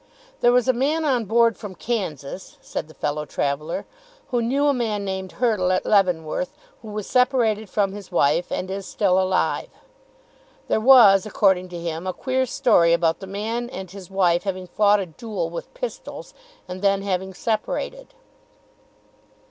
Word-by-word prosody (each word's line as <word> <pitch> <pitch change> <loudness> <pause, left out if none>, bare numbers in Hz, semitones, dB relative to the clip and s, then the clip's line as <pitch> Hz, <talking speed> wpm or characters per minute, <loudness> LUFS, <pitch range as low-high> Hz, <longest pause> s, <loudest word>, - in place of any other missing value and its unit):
"There 240 - +4
was 250 0 +3
a 260 - +4
man 295 +6 0
on 250 -6 +1
board 230 +1 +3
from 200 -3 -9
Kansas," 185 - -4
said - - -5
the 155 - -16
fellow 150 +1 -2
traveller, 150 +2 -3 0.4
"who 245 -2 0
knew 270 +5 +1
a 290 - +4
man 220 -5 -2
named 190 -1 -4
Hurtle 215 -7 +1
at 185 - 0
Leavenworth, 185 - +1 0.3
who 225 - -11
was 210 -1 -5
separated 235 -5 +2
from 200 -1 +1
his 200 -1 -10
wife 155 +5 +2
and 185 +1 -3
is 195 0 -5
still 190 -3 +2
alive. 185 0 0 1.0
There - - +1
was, 215 -5 +7
according 190 -3 +2
to 175 - -7
him, 170 +1 -4
a 185 - -1
queer 260 +3 -1
story 200 -11 +3
about 165 -1 +2
the 195 - -8
man 225 +5 -3
and 190 -6 -8
his 195 -2 -10
wife 180 -3 +2
having 185 -2 -4
fought 205 +2 +3
a 195 - -2
duel 175 0 -5
with 170 - -7
pistols, - - -7 0.3
and 185 0 -7
then 195 -1 +2
having 190 -1 -2
separated." 235 - -3
200 Hz, 165 wpm, -23 LUFS, 180-235 Hz, 1.0 s, was